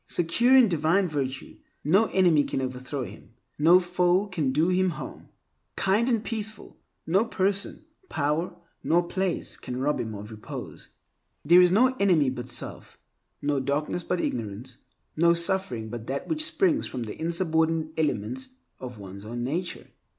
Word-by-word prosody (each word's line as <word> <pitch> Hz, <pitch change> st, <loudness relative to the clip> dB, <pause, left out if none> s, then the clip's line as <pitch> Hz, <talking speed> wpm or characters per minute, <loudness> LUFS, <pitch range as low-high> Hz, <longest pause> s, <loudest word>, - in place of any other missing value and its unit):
Secure 235 Hz, +10 st, +3 dB
in 250 Hz, -3 st, +7 dB
divine 170 Hz, +2 st, +2 dB
virtue, 135 Hz, -4 st, -4 dB, 0.3 s
no 190 Hz, +9 st, +4 dB
enemy 175 Hz, -6 st, +4 dB
can -, -, -3 dB
overthrow 130 Hz, +1 st, -4 dB
him; 110 Hz, +2 st, -12 dB, 0.2 s
no 170 Hz, +4 st, +7 dB
foe 180 Hz, +1 st, +2 dB
can 165 Hz, -9 st, -1 dB
do 180 Hz, +6 st, +2 dB
harm. 165 Hz, -, -8 dB, 0.5 s
Kind 210 Hz, +6 st, +2 dB
and 230 Hz, -3 st, +1 dB
peaceful, 215 Hz, -2 st, -5 dB, 0.3 s
no 190 Hz, +6 st, +3 dB
person, 200 Hz, -2 st, -1 dB, 0.2 s
power, 155 Hz, +4 st, -1 dB, 0.3 s
nor 175 Hz, +1 st, +3 dB
place 190 Hz, -1 st, -2 dB
can 125 Hz, 0 st, -6 dB
rob 145 Hz, +3 st, 0 dB
him 110 Hz, -2 st, -4 dB
of 105 Hz, +2 st, -8 dB
repose. 110 Hz, -1 st, -8 dB, 0.6 s
There 175 Hz, +4 st, +7 dB
is 180 Hz, -1 st, +5 dB
no 255 Hz, +7 st, +4 dB
enemy 165 Hz, -9 st, +3 dB
but 125 Hz, -1 st, -6 dB
self, 120 Hz, -, -6 dB, 0.5 s
no 145 Hz, -1 st, +1 dB
darkness 145 Hz, +6 st, -2 dB
but 180 Hz, -, -1 dB
ignorance, 115 Hz, +1 st, -4 dB, 0.4 s
no 170 Hz, +2 st, +4 dB
suffering 170 Hz, -, 0 dB
but 115 Hz, 0 st, -7 dB
that 135 Hz, +1 st, -3 dB
which 310 Hz, -1 st, 0 dB
springs 325 Hz, -2 st, +1 dB
from 125 Hz, -, -5 dB
the 110 Hz, +5 st, -8 dB
insubordinate 160 Hz, -2 st, 0 dB
elements 260 Hz, -, -1 dB, 0.3 s
of 125 Hz, -3 st, -8 dB
one's 100 Hz, 0 st, -10 dB
own 120 Hz, +3 st, -5 dB
nature. 170 Hz, +8 st, -3 dB
165 Hz, 150 wpm, -26 LUFS, 130-190 Hz, 0.6 s, in